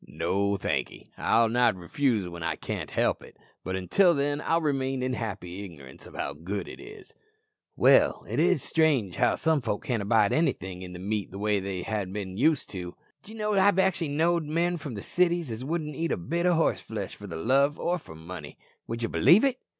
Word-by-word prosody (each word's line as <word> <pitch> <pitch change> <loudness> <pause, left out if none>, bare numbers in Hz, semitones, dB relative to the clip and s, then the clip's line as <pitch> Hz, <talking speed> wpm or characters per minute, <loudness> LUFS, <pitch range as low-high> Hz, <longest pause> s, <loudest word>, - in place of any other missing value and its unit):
"No, 100 +6 0
thankee; - - -3
I'll 115 0 +3
not 120 -2 +3
refuse 105 +3 0
when 85 -1 -8
I 80 - -1
can't - - -5
help - - 0
it, - - -15 0.3
but 95 - -3
until 165 - +3
then 145 +1 0
I'll 165 +2 +2
remain 135 -4 -1
in 130 0 -1
happy 100 -5 -5
ignorance 70 -9 -11
of - - -14
how - - -3
good 95 +6 -5
it - - -9
is." 405 0 -12 0.6
"Well, - - +4
it - - -2
is - - +3
strange 135 - +1
how - - +3
some 160 -2 +1
folk 110 -4 -3
can't 120 -4 -1
abide 105 0 +3
anything 95 - -1
in 90 -1 -8
the - - -7
meat 100 +1 -2
way 105 +1 0
they 95 -2 -4
ha'n't 105 -4 -3
bin 95 -3 -5
used 150 +6 +2
to. 90 -2 -6 0.3
D'ye 220 +2 -12
know 210 -1 -1
I've 200 -1 +4
actually 190 -3 +2
knowed 165 +3 +1
men 170 +3 0
from 145 -6 -7
the 100 - -6
cities 175 -5 +1
as 110 +3 -5
wouldn't 150 0 -3
eat 165 +3 -2
a - - 0
bit 170 - -1
o' 175 - +4
horseflesh 110 -10 -1
for 105 - -10
love 135 - +1
or 175 -1 -1
money. 80 -2 -9 0.3
Would 115 +1 -4
ye - - +1
believe 190 - +5
it?" 260 -2 0
120 Hz, 200 wpm, -27 LUFS, 95-160 Hz, 0.6 s, believe